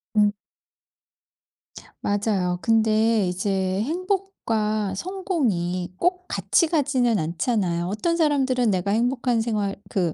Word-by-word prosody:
음. 210 -1 +4 1.7
맞아요. 200 -4 0
근데 220 -2 +3
이제 190 +1 -1
행복과 260 - -1
성공이 195 - -2
꼭 360 - 0
같이 335 - +2
가지는 260 - +1
않잖아요. 175 +1 -1
어떤 215 - -1
사람들은 265 -7 +2
'내가 185 +1 0
행복한 240 +1 +1
생활 210 -3 -1
그 175 -5 0
220 Hz, 225 characters per minute, -24 LUFS, 190-270 Hz, 1.7 s, 음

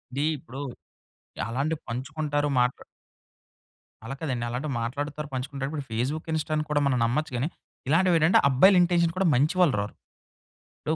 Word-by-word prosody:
D 145 - +1
ఇప్పుడు 130 +1 -9 0.9
అలాంటివి 140 +7 -2
పంచుకుంటారు. 145 +4 -2
మాట్ల 125 0 +1 1.2
అలా 135 +4 -5
కాదండి. 125 -7 -2
అలాంటివి 135 +4 -3
మాట్లాడుతారు. 145 +5 -4
పంచుకుంటారు. 135 +1 -3
ఇప్పుడు 150 -3 -4
ఫేస్‌బుక్, 135 +9 -2
ఇన్స్టా‌ని 155 -1 -1
కూడా 145 -1 +2
మనం 130 -2 +2
నమ్మొచ్చు 150 +6 -1
గాని, 130 +6 0 0.4
ఇలాంటివేటంటే 165 +2 +4
అబ్బాయిల 165 +10 +6
ఇంటెన్షన్ 170 -1 +3
కూడా 190 -1 +2
మంచివాళ్ళు 155 - +3
రారు. 105 - -5 0.9
ఇప్పుడు 155 - -1
145 Hz, 130 wpm, -26 LUFS, 130-160 Hz, 1.2 s, అబ్బాయిల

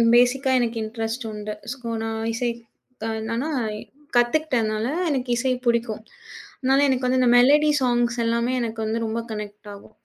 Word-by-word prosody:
பேசிக்கா 260 +2 +4
எனக்கு 235 -1 -1
இண்டரெஸ்ட் 225 +2 -4
உண்டு. 210 0 -5 0.2
ஸோ, 270 - -15 0.2
நான் 225 0 -3
இசை 240 +1 -1 0.5
க - - -2 0.2
என்னனா, 230 +7 -2 0.7
கத்துக்கிட்டனால 240 -4 +1 0.2
எனக்கு 260 -4 -1
இசை 260 +1 +1
புடிக்கும். 235 -2 0 0.6
அதனால 270 +1 +3
எனக்கு 260 -1 +1
வந்து 255 +1 +2
இந்த 250 - +4
மெலோடி 295 +5 +6
ஸாங்க்ஸ்லாமே 240 -1 +1
எனக்கு 225 -2 -3
வந்து 220 +1 -1
ரொம்ப 225 +1 -2
கனெக்ட் 210 -1 -7
ஆகும் 200 +2 -14
240 Hz, 145 wpm, -23 LUFS, 225-255 Hz, 0.7 s, மெலோடி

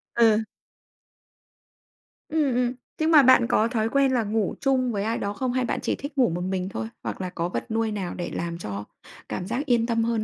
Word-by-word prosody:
Ừ. 225 -2 +4 1.9
Ừm, 300 -5 +1
ừm. 245 0 +1 0.3
Nhưng 315 +1 +2
mà 300 -4 +8
bạn 250 -2 +6
có 225 -2 +3
thói 225 -2 0
quen 275 0 +3
là 245 -3 +2
ngủ 210 -1 -1
chung 260 -3 +2
với 200 -2 -1
ai 225 +2 -1
đó 200 0 -2
không? 250 +4 -2
Hay 255 -1 +1
bạn - - -1
chỉ - - 0
thích 285 +1 -8
ngủ 250 -6 +4
một 175 +2 -3
mình 185 0 -2
thôi? 110 - -4 0.2
Hoặc 115 - -4
là 185 - -3
có 170 0 -3
vật 220 - -4
nuôi 225 0 0
nào 195 -4 -3
để 175 - -4
làm 170 0 -3
cho 100 - -5 0.5
cảm 180 - -4
giác 245 +7 -2
yên 240 -4 +2
tâm 230 -1 +1
hơn 230 -2 0
225 Hz, 225 wpm, -25 LUFS, 190-255 Hz, 1.9 s, mà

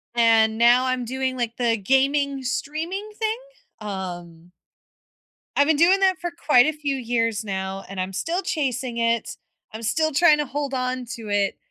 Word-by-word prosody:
And 225 -2 +4
now 240 +2 +5
I'm 255 -1 -1
doing 260 +1 -2
like 235 -2 -2
the 235 -2 +1
gaming 275 +5 +1
streaming 325 +11 -4
thing, 440 +1 -1 0.4
um 175 -4 -7 1.0
I've 285 - +4
been 315 -2 +3
doing 355 +5 +5
that 380 -1 +2
for 350 -1 -4
quite 295 -7 +4
a 310 - +2
few 290 -2 -2
years 230 -3 -1
now 190 -1 -4
and 195 0 -7
I'm 185 +1 -4
still 340 - -2
chasing 260 -8 -2
it, 230 -1 0 0.3
I'm 220 +1 -8
still 315 +8 +1
trying 310 +1 +5
to 295 - 0
hold 285 +1 -4
on 255 -1 -2
to 225 -2 -9
it, 200 -1 0
255 Hz, 170 wpm, -23 LUFS, 220-295 Hz, 1.0 s, now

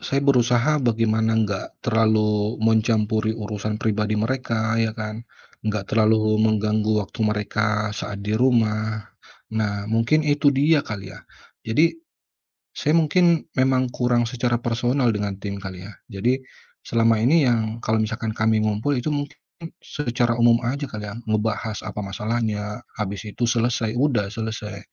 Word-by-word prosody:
saya 135 - -1
berusaha 125 +1 +3
bagaimana 115 -2 +1
enggak 100 -3 -2
terlalu 110 -2 +2
mencampuri 110 -1 +2
urusan 105 -1 -4
pribadi 105 -1 0
mereka 110 -1 -1
ya 115 -1 +1
kan, 110 +1 -5 0.4
enggak 105 -2 -2
terlalu 110 -1 +3
mengganggu 110 0 +2
waktu 100 - -10
mereka 105 0 0
saat 100 -1 -5
di 105 - -2
rumah. 110 -3 +1 0.5
Nah, 100 -2 -1
mungkin 115 +7 +2
itu 145 -1 +3
dia 145 +3 +3
kali 95 -3 -6
ya, - - -12 0.4
jadi 150 - +2 0.8
saya 150 - 0
mungkin 170 0 +3 0.2
memang 130 -1 +2
kurang 120 -1 +1
secara 120 +1 -1
personal 120 +2 +1
dengan 105 -2 -2
tim 100 0 -6
kali 95 -2 -8
ya? 100 - -9 0.2
Jadi, 120 +5 0 0.5
selama 115 -1 +3
ini 145 +8 +4
yang 115 -2 0
kalau 110 0 +1
misalkan 110 0 -2
kami 110 0 +1
ngumpul 110 +7 0
itu 125 +4 -1
mungkin 145 -1 -3 0.5
secara 120 -4 -1
umum 115 0 +6
aja 140 +4 -2
kali 105 -3 -7
ya, - - -7
ngebahas 110 0 -1
apa 105 -1 -6
masalahnya, 105 +1 -3 0.2
habis 100 -1 -4
itu 105 +3 -5
selesai 115 -1 +1
udah 120 -8 +1
selesai. 110 -2 -5
110 Hz, 140 wpm, -23 LUFS, 105-120 Hz, 0.8 s, umum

